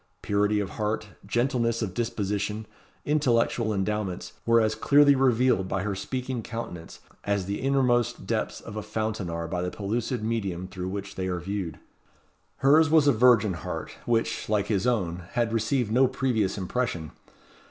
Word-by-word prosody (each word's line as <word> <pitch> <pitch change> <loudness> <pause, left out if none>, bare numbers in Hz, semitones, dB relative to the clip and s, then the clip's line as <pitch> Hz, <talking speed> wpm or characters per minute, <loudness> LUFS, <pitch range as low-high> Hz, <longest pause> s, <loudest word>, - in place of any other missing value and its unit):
Purity 105 +1 +2
of 100 -2 -3
heart, 105 0 -2 0.2
gentleness 120 0 +1
of 95 -4 -4
disposition, 105 -1 -2 0.4
intellectual 120 -6 +2
endowments, 95 -3 -2
were 115 0 +6
as 110 -1 +2
clearly 145 +5 +5
revealed 125 -6 +3
by 95 0 -1
her 105 0 -1
speaking 125 +4 -3
countenance 105 -7 -7 0.2
as 100 -2 0
the 100 +2 -3
innermost 130 -3 +1
depths - - -2
of 105 - -9
a 110 - -3
fountain 110 -3 -3
are 85 0 -3
by 90 +1 -2
the 90 - -1
pellucid 110 +4 -2
medium 100 -6 -2
through 95 -1 -5
which 100 0 -5
they 95 0 -3
are 90 -1 -2
viewed. 95 -1 -4 0.8
Hers 150 +3 +5
was 155 -1 +5
a 140 - +6
virgin 115 -4 +5
heart, 85 - -5 0.2
which, 115 -3 0
like 105 -2 +1
his 100 0 +1
own, 90 -7 -1
had 115 -1 0
received 115 +1 0
no 130 +3 +5
previous 125 -7 0
impression. 95 -5 -2
110 Hz, 160 wpm, -27 LUFS, 95-120 Hz, 0.8 s, were